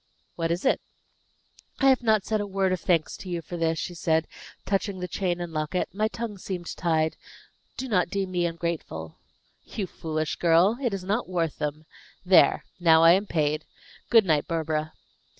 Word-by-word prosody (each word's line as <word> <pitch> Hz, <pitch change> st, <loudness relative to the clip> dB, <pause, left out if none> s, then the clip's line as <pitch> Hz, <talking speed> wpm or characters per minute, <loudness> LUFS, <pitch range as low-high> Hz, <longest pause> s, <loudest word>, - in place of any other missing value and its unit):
"What 165 Hz, -1 st, -1 dB
is 170 Hz, +6 st, -2 dB
it?" -, -, +3 dB, 1.0 s
"I 270 Hz, -, +5 dB
have 260 Hz, -1 st, +4 dB
not 220 Hz, -4 st, +2 dB
said 215 Hz, -1 st, 0 dB
a 205 Hz, -, -3 dB
word 195 Hz, -1 st, 0 dB
of 185 Hz, -, -2 dB
thanks 165 Hz, -4 st, +1 dB
to 185 Hz, -, -9 dB
you 170 Hz, -2 st, -3 dB
for 175 Hz, -, -7 dB
this," 165 Hz, -1 st, 0 dB
she 180 Hz, -, -4 dB
said, 160 Hz, -1 st, +1 dB, 0.4 s
touching 195 Hz, 0 st, -1 dB
the 180 Hz, -, -3 dB
chain 180 Hz, 0 st, -1 dB
and 175 Hz, -2 st, -5 dB
locket; 155 Hz, +3 st, -1 dB
"my 215 Hz, +2 st, +1 dB
tongue 220 Hz, -3 st, -6 dB
seemed 180 Hz, -2 st, -5 dB
tied. 160 Hz, -2 st, +1 dB, 0.6 s
Do 265 Hz, -, -4 dB
not 185 Hz, -7 st, +1 dB
deem 195 Hz, -2 st, -2 dB
me 175 Hz, -1 st, +1 dB
ungrateful." 165 Hz, -, -5 dB, 0.4 s
"You 205 Hz, -, -4 dB
foolish 155 Hz, -3 st, -3 dB
girl! 175 Hz, +7 st, +4 dB
It 245 Hz, -4 st, 0 dB
is 190 Hz, -, -6 dB
not 205 Hz, +3 st, -1 dB
worth 170 Hz, -4 st, -1 dB
them. 150 Hz, +1 st, -3 dB, 0.4 s
There! 185 Hz, 0 st, +5 dB
Now 165 Hz, -2 st, +6 dB
I 165 Hz, -, +9 dB
am 195 Hz, +4 st, +3 dB
paid. 155 Hz, -3 st, 0 dB, 0.5 s
Good 225 Hz, -4 st, +6 dB
night, 155 Hz, -4 st, +2 dB
Barbara." 155 Hz, -1 st, -2 dB
175 Hz, 185 wpm, -26 LUFS, 160-195 Hz, 1.0 s, I